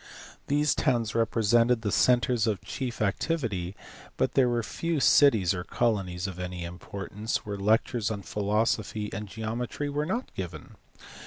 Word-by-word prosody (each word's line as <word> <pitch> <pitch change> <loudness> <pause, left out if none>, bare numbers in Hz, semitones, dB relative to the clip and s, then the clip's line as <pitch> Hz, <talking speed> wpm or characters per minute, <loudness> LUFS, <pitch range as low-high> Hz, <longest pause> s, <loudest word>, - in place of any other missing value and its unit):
These 150 +1 +2
towns 120 -6 +1
represented 115 +1 +3
the 105 - 0
centres 120 -1 +3
of 105 -3 0
chief 125 -5 -3
activity, 100 - -1 0.4
but - - +1
there 130 -2 +4
were 120 -1 0
few 165 +6 -2
cities 110 - +5
or 90 -2 -4
colonies 95 -5 -1
of 95 -2 -5
any 90 -1 -4
importance 100 +5 -5
where 105 -1 -4
lectures 110 +3 +1
on 100 -3 -4
philosophy 105 +1 -1
and 105 +1 -4
geometry 115 +7 -4
were 150 +1 -1
not 235 +8 -3
given. 85 -5 -7
110 Hz, 145 wpm, -28 LUFS, 100-125 Hz, 0.4 s, cities